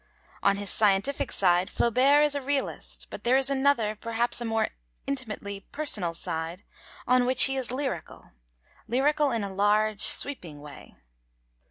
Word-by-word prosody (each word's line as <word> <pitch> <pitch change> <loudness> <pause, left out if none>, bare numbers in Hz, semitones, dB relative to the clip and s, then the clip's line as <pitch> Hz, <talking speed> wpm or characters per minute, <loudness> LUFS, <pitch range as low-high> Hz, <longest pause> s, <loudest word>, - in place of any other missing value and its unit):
On 200 0 +2
his 200 -1 -1
scientific 220 +7 +1
side 180 -1 +2
Flaubert 270 +5 +3
is 295 - 0
a 285 - -3
realist, 275 0 -2
but - - -9
there 250 +2 +3
is 270 0 +1
another, 265 -6 +1
perhaps 230 +3 -1
a - - -4
more 225 -1 -1 0.4
intimately 215 -7 -5
personal 210 - 0
side, 165 +2 -4 0.4
on 250 0 +3
which 255 -1 +6
he 270 - +4
is 260 -3 -2
lyrical, 255 - -6 0.6
lyrical 290 +5 +1
in 230 -4 -2
a 195 -1 -6
large, 210 +1 +1
sweeping 175 - +2
way. 145 -1 -13
235 Hz, 150 wpm, -26 LUFS, 200-270 Hz, 0.6 s, which